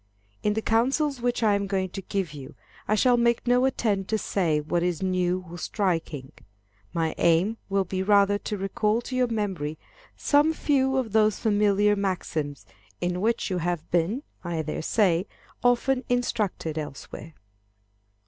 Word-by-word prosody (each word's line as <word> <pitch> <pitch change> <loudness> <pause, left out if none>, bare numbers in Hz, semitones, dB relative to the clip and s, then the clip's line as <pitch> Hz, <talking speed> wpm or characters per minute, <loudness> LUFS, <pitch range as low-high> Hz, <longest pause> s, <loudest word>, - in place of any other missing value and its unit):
In 210 - +1
the 220 - -1
counsels 265 +4 +1
which 245 -1 0
I 210 -2 +4
am 200 0 0
going 190 -1 -1
to 195 - -6
give 190 -5 -3
you, 135 -3 -10 0.3
I 215 - +3
shall 245 +2 +4
make 235 0 +2
no 245 +1 +3
attempt 210 -7 0
to 220 - +1
say 170 -7 0
what 170 +3 -1
is 175 0 -1
new 185 0 0
or 175 +1 -9
striking. 165 -10 -2 0.6
My 165 -1 -1
aim 175 +7 +3
will 195 0 +2
be 185 +1 -3
rather 200 0 +4
to 210 - -4
recall 210 +3 0
to 255 - -6
your 255 -1 +2
memory 190 -9 -2 0.4
some 295 +2 +3
few 265 -4 +1
of 245 -5 -1
those 215 0 +3
familiar 205 -1 +3
maxims, 155 - -3 0.3
in 180 +1 -1
which 225 -1 0
you 180 - 0
have 175 -1 -3
been, 180 - +1 0.2
I 170 -2 -3
dare 155 - -4
say, 185 +1 +2 0.4
often 250 +2 +2
instructed 210 -10 -1
elsewhere. 150 +1 -8
200 Hz, 160 wpm, -26 LUFS, 175-230 Hz, 0.6 s, I